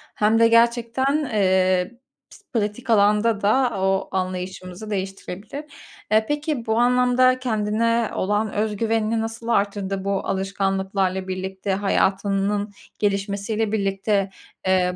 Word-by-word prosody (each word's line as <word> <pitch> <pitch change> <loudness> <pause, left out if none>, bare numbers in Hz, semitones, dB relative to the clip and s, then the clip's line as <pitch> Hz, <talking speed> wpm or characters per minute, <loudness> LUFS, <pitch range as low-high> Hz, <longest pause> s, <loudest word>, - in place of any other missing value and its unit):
hem 215 +2 +3
de 230 - +6
gerçekten, 235 +5 +2
eee, 185 -1 +2 0.4
pis 410 - -17
pratik 225 +3 -2
alanda 210 0 +3
da 230 0 +2
o 190 0 0
anlayışımızı 185 +2 -4
değiştirebilir. 195 +6 -5 0.5
E, 220 0 +4
peki, 295 -2 -2
bu 220 +1 +1
anlamda 250 +1 +4
kendine 230 0 0
olan 205 +2 0
öz 210 0 -1
güvenini 225 0 0
nasıl 225 +1 -6
arttırdı, 200 -3 0
bu 200 -1 -1
alışkanlıklarla 195 -1 -1
birlikte, 190 +1 -3
hayatının 200 +1 0 0.3
gelişmesiyle 205 +2 -1
birlikte? 195 -1 0 0.4
Eee, 180 -1 +2
205 Hz, 110 wpm, -23 LUFS, 195-230 Hz, 0.5 s, de